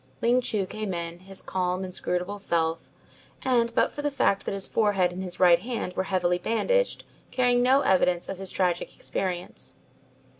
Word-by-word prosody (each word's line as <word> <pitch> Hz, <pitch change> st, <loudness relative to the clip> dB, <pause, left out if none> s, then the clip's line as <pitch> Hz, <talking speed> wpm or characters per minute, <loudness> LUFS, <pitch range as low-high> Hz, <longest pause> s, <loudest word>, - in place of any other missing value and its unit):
Ling 245 Hz, +2 st, +3 dB
Chu 210 Hz, -5 st, -1 dB
came 210 Hz, -1 st, -4 dB
in, 170 Hz, 0 st, -5 dB
his 190 Hz, +1 st, -8 dB
calm, 185 Hz, 0 st, -1 dB
inscrutable 185 Hz, +2 st, -3 dB
self, 165 Hz, -3 st, 0 dB, 0.5 s
and 240 Hz, -3 st, +2 dB
but -, -, +3 dB
for 290 Hz, -, -6 dB
the 290 Hz, -, 0 dB
fact 235 Hz, -8 st, +1 dB
that -, -, -2 dB
his 195 Hz, -1 st, -2 dB
forehead 200 Hz, -5 st, +2 dB
and 180 Hz, +1 st, -6 dB
his 180 Hz, -1 st, -6 dB
right 175 Hz, -2 st, +6 dB
hand 230 Hz, -3 st, -4 dB
were 190 Hz, -, -1 dB
heavily 180 Hz, -2 st, +1 dB
bandaged, -, -, 0 dB, 0.3 s
carrying 245 Hz, -1 st, +2 dB
no 260 Hz, +3 st, +5 dB
evidence 180 Hz, -4 st, +2 dB
of 195 Hz, -, -5 dB
his 195 Hz, -1 st, -5 dB
tragic 180 Hz, -2 st, -1 dB
experience. 180 Hz, -2 st, -5 dB
190 Hz, 175 wpm, -26 LUFS, 180-230 Hz, 0.5 s, right